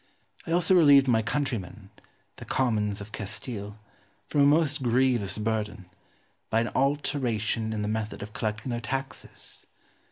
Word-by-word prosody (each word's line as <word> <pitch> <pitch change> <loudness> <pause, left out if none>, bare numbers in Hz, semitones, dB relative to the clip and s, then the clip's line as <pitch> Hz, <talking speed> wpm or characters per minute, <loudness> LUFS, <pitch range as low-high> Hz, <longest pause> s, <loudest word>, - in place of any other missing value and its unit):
I - - -3
also 175 +2 +3
relieved 145 -6 +7
my 115 -3 +4
countrymen, 110 -6 -3 0.5
the - - -9
commons 105 -5 0
of 105 +1 -9
Castile, 105 0 -6 0.5
from 145 - +2
a - - +7
most 145 -1 +3
grievous 120 -5 +2
burden, 105 -4 -3 0.6
by 115 - +2
an 115 - -1
alteration 125 -6 0
in 105 -1 -2
the - - -2
method 110 -1 -3
of 105 +1 -9
collecting 110 0 -3
their 120 0 -2
taxes. 135 +4 -5
115 Hz, 140 wpm, -27 LUFS, 105-135 Hz, 0.6 s, relieved